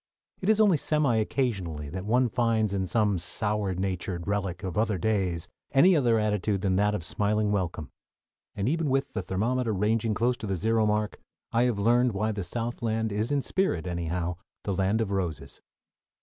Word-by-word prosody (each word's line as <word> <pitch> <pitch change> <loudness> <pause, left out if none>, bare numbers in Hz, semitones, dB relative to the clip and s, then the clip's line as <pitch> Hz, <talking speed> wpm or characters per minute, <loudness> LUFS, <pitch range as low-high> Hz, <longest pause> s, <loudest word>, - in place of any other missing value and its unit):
It 190 - 0
is 220 -1 +4
only 205 -6 +5
semi 145 -5 +2
occasionally 100 - -1
that 95 +5 -6
one 125 +3 +3
finds 115 -3 +1
in 95 -1 -1
some 105 -3 +1
sour 100 +2 -1
natured 90 -1 -3
relic 100 -3 -2
of 95 -3 -4
other 105 -2 +1
days 90 -3 0 0.3
any 175 +7 +6
other 120 -6 +3
attitude 105 -2 0
than 95 -2 +1
that 105 +1 +2
of 85 - -5
smiling 105 +2 0
welcome, 85 -7 -2 0.6
and 100 +1 -1
even 160 +1 0
with 135 +1 0
the 100 - -2
thermometer 110 +6 -1
ranging 110 +2 +1
close 120 +3 +1
to 110 - -6
the 95 - 0
zero 110 +3 +1
mark 105 0 -1 0.3
I 120 +2 +3
have 120 -4 0
learned 120 +3 +3
why 105 +3 0
the 100 -2 -3
Southland 115 +2 -2
is 105 +5 -1
in 140 -2 +1
spirit 190 - 0
anyhow 85 0 -2 0.3
the 100 - -1
"Land 95 +4 +1
of 105 -3 -2
Roses." 90 -7 -3
105 Hz, 180 wpm, -27 LUFS, 95-115 Hz, 0.6 s, any